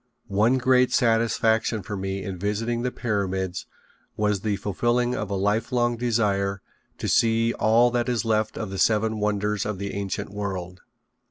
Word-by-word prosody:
One 110 +6 +3
great 125 0 +3
satisfaction 115 -2 +2
for 105 - -5
me 95 0 -3
in 95 -2 -5
visiting 115 +4 -1
the 125 - 0
pyramids 95 -6 -2 0.5
was 105 -2 +1
the 105 -1 0
fulfilling 120 +5 0
of 105 -5 -3
a 100 - -1
life 105 +5 0
long 120 -1 +1
desire 105 -5 0 0.4
to - - -4
see 115 0 +3
all 115 +3 +3
that 120 0 0
is 120 -2 0
left 110 -1 0
of 110 -3 -4
the 95 - -4
seven 110 0 +2
wonders 105 0 0
of 105 -2 -3
the 100 +1 -5
ancient 100 -1 -4
world. 95 -3 -5
105 Hz, 165 wpm, -25 LUFS, 100-115 Hz, 0.5 s, One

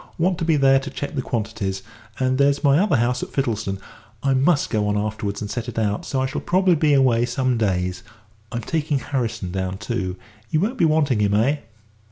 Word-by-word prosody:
Want 175 +1 +1
to 165 - -1
be 160 -1 +3
there 135 -1 +5
to 135 +1 -6
check 145 - -5
the 140 - -1
quantities, 105 -5 -3 0.4
and 130 0 +1
there's 140 +1 +3
my 140 +1 +5
other 195 -5 +3
house 125 0 +1
at - - -4
Fittlesdon. 110 -7 -1 0.5
I 135 -1 +2
must 140 +3 +2
go 105 -3 +1
on 105 0 +1
afterwards 105 -1 -3
and 105 0 -4
set 120 0 -3
it 120 - -9
out, 105 -2 -1
so 130 - -1
I - - +1
shall 130 - -3
probably 185 0 +3
be 150 -2 +3
away 125 -4 +4
some 130 +1 0
days. 90 -5 -1 0.5
I'm 120 -1 -3
taking 155 +3 -1
Harrison 120 -9 -3
down, 95 0 -3
too. 100 -4 -3 0.3
You 155 - +1
won't 225 +9 -1
be 170 - +5
wanting 150 -7 +2
him, 100 -1 +2
eh?" 130 +8 +2
125 Hz, 215 wpm, -22 LUFS, 105-145 Hz, 0.5 s, there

